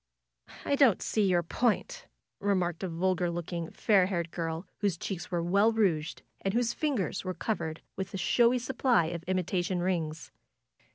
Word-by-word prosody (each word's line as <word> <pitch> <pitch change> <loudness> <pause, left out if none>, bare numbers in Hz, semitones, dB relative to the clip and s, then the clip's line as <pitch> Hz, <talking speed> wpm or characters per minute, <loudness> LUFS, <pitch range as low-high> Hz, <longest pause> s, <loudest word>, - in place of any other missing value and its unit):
"I - - 0
don't 265 -9 +5
see 210 -3 +1
your 175 -1 +3
point," 250 - -1 0.3
remarked 185 -4 0
a 190 - -2
vulgar 180 +1 0
looking, 170 0 -4
fair 195 -4 +3
haired 170 -4 -2
girl, 165 +1 -3
whose 200 -5 0
cheeks 180 0 -5
were 175 -2 -1
well 200 +6 +4
rouged, 180 -8 0 0.2
and 195 +2 -1
whose 240 -1 +1
fingers 275 - -1
were 185 -1 -3
covered 160 -4 -3
with 190 0 -4
a - - -4
showy 235 +6 +3
supply 245 -6 +2
of 170 - -4
imi 185 -1 +1
tation 180 0 -1
rings. 165 -4 -2
185 Hz, 165 wpm, -30 LUFS, 170-215 Hz, 0.3 s, don't